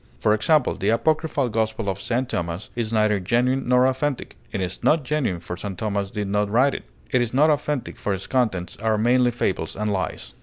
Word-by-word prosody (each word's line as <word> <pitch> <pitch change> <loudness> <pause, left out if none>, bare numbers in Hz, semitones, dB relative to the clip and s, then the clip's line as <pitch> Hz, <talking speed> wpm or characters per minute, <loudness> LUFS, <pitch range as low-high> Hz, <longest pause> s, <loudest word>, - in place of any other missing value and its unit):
For 105 - +3
example, 130 +6 +3
the 100 - -1
apocryphal 145 +2 +1
Gospel 110 -1 -1
of 95 0 -2
St. 125 +5 -1
Thomas 85 0 -4
is 115 -2 -2
neither 105 -2 +2
'genuine' 125 +8 +1
nor 125 0 +5
'authentic.' 130 0 -2 0.2
It 100 - -3
is 90 -2 -4
not 155 -2 +3
'genuine,' 125 - -1
for 90 +1 -5
St. 95 0 -6
Thomas 100 -1 -2
did 105 0 -3
not 105 +1 0
write 130 +6 +3
it; - - -6 0.3
it 125 - +3
is 120 +1 -2
not 150 +3 +5
'authentic,' 150 -2 -2
for 105 - -2
its 95 -1 -3
contents 105 -9 -1
are 110 0 +1
mainly 125 +3 +3
fables 95 -8 -2
and 105 0 -1
lies. 90 -4 -4
110 Hz, 205 wpm, -23 LUFS, 100-130 Hz, 0.3 s, nor